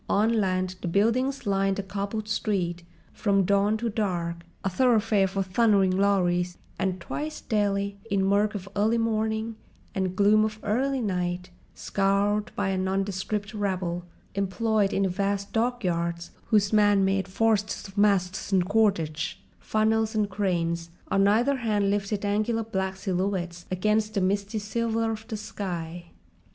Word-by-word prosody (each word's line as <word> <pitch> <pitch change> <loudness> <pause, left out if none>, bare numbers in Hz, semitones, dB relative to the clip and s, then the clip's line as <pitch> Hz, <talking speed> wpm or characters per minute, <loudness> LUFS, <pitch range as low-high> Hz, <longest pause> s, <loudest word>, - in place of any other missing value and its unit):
On 220 +3 +3
land 185 -1 -1
the - - -3
buildings 230 +9 +1
lined 195 -1 +1
a 200 - -2
cobbled 200 +2 -4
street, 180 -5 -1 0.3
from 200 -3 +2
dawn 200 +3 +2
to 235 +2 -2
dark 175 -6 -2 0.2
a 195 - +1
thoroughfare 220 -2 +3
for 195 +1 -1
thundering 195 -1 +3
lorries 180 -2 +1 0.2
and, 190 -1 -1
twice 305 - -5
daily, 200 -2 -1
in 195 -2 +1
murk 205 +2 +2
of 195 -1 -5
early 215 +3 +2
morning 220 0 -1 0.4
and 190 -2 -1
gloom 210 +2 +5
of 215 0 -2
early 260 +5 0
night, 180 -3 -2 0.2
scoured 200 +1 +1
by 200 -1 0
a 190 -1 0
nondescript 195 +2 -2
rabble 185 -4 -2 0.3
employed 200 +1 +1
in 195 - +1
the 190 - +2
vast 200 +2 -2
dockyards 175 -8 -1 0.2
whose 205 -1 +3
man 205 -2 +5
made 195 -1 +1
forests 210 +1 0
of 195 - -14
masts 200 -2 +1
and 185 -2 +3
cordage, 165 -7 +1 0.2
funnels 220 +1 +1
and 210 -2 +1
cranes, 170 -4 -1 0.2
on 195 0 +4
either 240 +7 +3
hand 210 -5 +1
lifted 205 0 -1
angular 215 +3 0
black 190 -3 -2
silhouettes 185 -2 -2
against 215 +3 0
the 200 - +2
misty 200 +3 0
silver 225 +1 -1
of 220 0 -6
the 220 -3 -4
sky. 175 -5 -5
200 Hz, 145 wpm, -26 LUFS, 185-215 Hz, 0.4 s, gloom